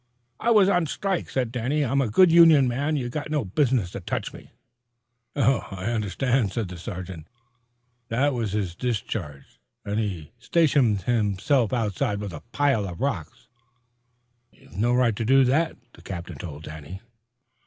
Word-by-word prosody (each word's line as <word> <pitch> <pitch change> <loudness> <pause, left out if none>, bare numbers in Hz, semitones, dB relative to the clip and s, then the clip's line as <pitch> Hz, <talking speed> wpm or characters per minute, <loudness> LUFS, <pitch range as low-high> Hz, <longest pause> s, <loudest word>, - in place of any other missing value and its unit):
"I 235 - 0
was 210 -4 +6
on 180 -4 +2
strike," 195 +3 -2
said 125 -4 -1
Danny. 130 +5 0
"I'm 135 +2 +1
a 125 - 0
good 180 - +5
union 165 -5 +7
man. 140 +6 -1
You 130 -4 -2
got 145 +5 -5
no 150 -6 -1
business 115 - +1
to - - -6
touch - - -4
me." - - -13 0.9
"I 110 -7 0
understand," 115 +1 0
said 110 -6 -2
the 90 - -8
sergeant, 90 -4 -7 0.8
"that 135 +6 +1
he - - -4
was 100 -5 -2
discharged, 100 - -4 0.3
and 105 +1 -1
he 95 -8 -4
stationed 135 - +2
himself 115 +2 +1
outside 105 -4 -1
with 100 -3 -5
a 75 - -8
pile 140 -8 +1
of 90 -2 -8
rocks." 110 - -4 1.0
"You've - - -19
no 115 +6 +1
right 125 -3 +2
to 115 - -3
do 135 +4 +5
that," 155 +6 +1 0.2
the - - -16
captain 85 -2 -7
told 75 -3 -8
Danny. 80 +4 -9
120 Hz, 160 wpm, -25 LUFS, 95-140 Hz, 1.0 s, union